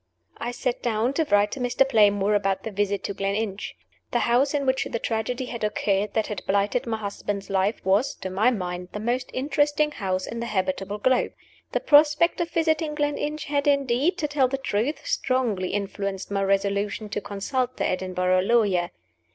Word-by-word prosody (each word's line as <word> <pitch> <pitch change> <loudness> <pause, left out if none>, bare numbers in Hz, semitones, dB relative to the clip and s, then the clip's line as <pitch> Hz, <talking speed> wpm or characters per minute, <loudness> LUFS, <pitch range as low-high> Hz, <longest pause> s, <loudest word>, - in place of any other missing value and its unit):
I 240 - -3
sat 245 0 -2
down 235 +2 0
to 320 +2 +1
write 205 0 +4
to - - -5
Mr. 250 +2 +2
Playmore 205 -3 +4
about 195 -2 +1
the 220 - -4
visit 200 -1 -1
to 200 - -3
Gleninch. 200 +1 -3 0.3
The 240 - +1
house 265 +5 +2
in 280 -1 0
which 260 0 +1
the - - -1
tragedy 230 +3 -2
had 235 -3 -6
occurred 210 -1 0
that 220 -1 +2
had 210 - -5
blighted 200 +5 +1
my 225 -1 -1
husband's 200 -1 -4
life 195 +3 +1
was, 200 +8 +2
to 190 - -6
my 210 +6 +3
mind, 180 -5 -4
the 210 - -4
most 245 +3 -1
interesting 295 +2 +1
house 185 -7 -2
on 230 - -5
the 235 - -3
habitable 195 0 -2
globe. 255 +4 +1 0.4
The - - 0
prospect 300 +4 +4
of 340 - -1
visiting 320 -2 0
Gleninch 295 0 -2
had, 285 0 0
indeed 280 +4 +2
(to 300 - -1
tell 285 -3 +2
the 270 +2 -2
truth), 265 +2 -2
strongly 235 -8 0
influenced 200 -1 -3
my 200 0 0
resolution 200 +2 0
to 205 - -3
consult 250 +6 -2
the - - 0
Edinburgh 185 0 +1
lawyer. 195 -5 +2
220 Hz, 185 wpm, -25 LUFS, 200-265 Hz, 0.4 s, write